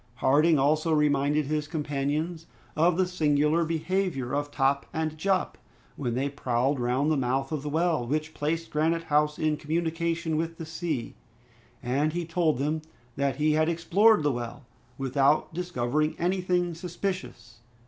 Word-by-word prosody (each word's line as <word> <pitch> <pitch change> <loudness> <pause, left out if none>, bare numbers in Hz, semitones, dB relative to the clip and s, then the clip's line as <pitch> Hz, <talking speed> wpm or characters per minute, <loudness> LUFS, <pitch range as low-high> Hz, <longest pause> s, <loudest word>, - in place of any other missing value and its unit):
Harding 150 +6 +4
also 155 +4 +2
reminded 150 -1 +2
his 150 +1 -2
companions 155 +2 -2 0.3
of 165 +2 +3
the 185 - +3
singular 155 -2 +2
behavior 165 -5 -1
of 145 0 -1
Top 140 -1 +1
and 160 -1 -2
Jup 190 +4 0 0.4
when 120 -4 -2
they 135 +3 0
prowled 135 0 0
round 125 +5 +1
the 155 - +2
mouth 135 +2 -1
of 155 -3 -2
the 150 - -4
well, 160 -5 +1
which 155 +3 -2
placed 165 +3 -2
Granite 165 +2 +1
House 150 -1 +1
in 155 -1 0
communication 165 +1 -1
with 165 +1 -2
the 165 - -6
sea, 160 -6 -3 0.7
and 140 +5 0
he 175 0 -2
told 165 -3 +1
them 150 +4 -1 0.3
that 140 -2 0
he 150 +2 +2
had 155 +1 +2
explored 185 +4 +4
the 145 - +2
well, 120 +2 -6 0.3
without 135 +4 +2
discovering 155 -2 -1
anything 180 -1 0
suspicious. 180 - -5
155 Hz, 150 wpm, -27 LUFS, 140-165 Hz, 0.7 s, Harding